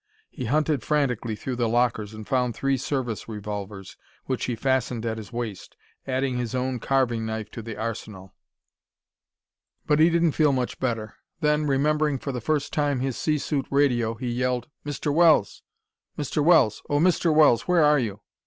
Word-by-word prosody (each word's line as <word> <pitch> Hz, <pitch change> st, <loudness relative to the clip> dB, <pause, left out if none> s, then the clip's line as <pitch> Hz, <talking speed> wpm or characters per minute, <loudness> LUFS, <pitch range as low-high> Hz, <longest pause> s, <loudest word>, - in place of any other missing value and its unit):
He 125 Hz, -, -6 dB
hunted 150 Hz, +2 st, +1 dB
frantically 125 Hz, -6 st, 0 dB
through 125 Hz, +3 st, -5 dB
the 120 Hz, -2 st, +1 dB
lockers 115 Hz, -3 st, +1 dB
and 110 Hz, -1 st, -9 dB
found 125 Hz, -3 st, 0 dB
three 135 Hz, 0 st, +1 dB
service 125 Hz, -4 st, -3 dB
revolvers, 105 Hz, -2 st, -6 dB, 0.3 s
which 130 Hz, -2 st, -2 dB
he 125 Hz, -, -2 dB
fastened 125 Hz, -1 st, -1 dB
at 110 Hz, -1 st, -2 dB
his 110 Hz, -, -10 dB
waist, 115 Hz, -5 st, -6 dB, 0.3 s
adding 130 Hz, -1 st, -1 dB
his 120 Hz, 0 st, -3 dB
own 130 Hz, 0 st, -1 dB
carving 120 Hz, -3 st, +1 dB
knife 110 Hz, -1 st, -4 dB
to 115 Hz, -, -7 dB
the 115 Hz, -1 st, -7 dB
arsenal. 105 Hz, -4 st, -6 dB, 1.5 s
But 150 Hz, 0 st, +2 dB
he 160 Hz, +2 st, +6 dB
didn't 170 Hz, -1 st, +2 dB
feel 150 Hz, -1 st, +3 dB
much 125 Hz, -2 st, -2 dB
better. 115 Hz, -4 st, -3 dB, 0.2 s
Then, 150 Hz, 0 st, +2 dB
remembering 150 Hz, +1 st, +1 dB
for 140 Hz, -, -5 dB
the 125 Hz, -2 st, -4 dB
first 150 Hz, +3 st, -1 dB
time 145 Hz, -4 st, 0 dB
his 135 Hz, -2 st, -2 dB
sea 155 Hz, -1 st, 0 dB
suit 140 Hz, -1 st, -2 dB
radio, 120 Hz, -5 st, +2 dB
he 120 Hz, +2 st, -4 dB
yelled: 125 Hz, 0 st, -1 dB, 0.2 s
"Mr. 145 Hz, 0 st, -2 dB
Wells! 160 Hz, -, +4 dB, 0.6 s
Mr. 145 Hz, +1 st, -1 dB
Wells! 160 Hz, -10 st, +4 dB
Oh, 145 Hz, -, +2 dB
Mr. 170 Hz, +1 st, +3 dB
Wells, 150 Hz, -6 st, +4 dB
where 175 Hz, -3 st, +4 dB
are 150 Hz, -1 st, +5 dB
you? 105 Hz, -4 st, -3 dB
125 Hz, 170 wpm, -25 LUFS, 115-145 Hz, 1.5 s, he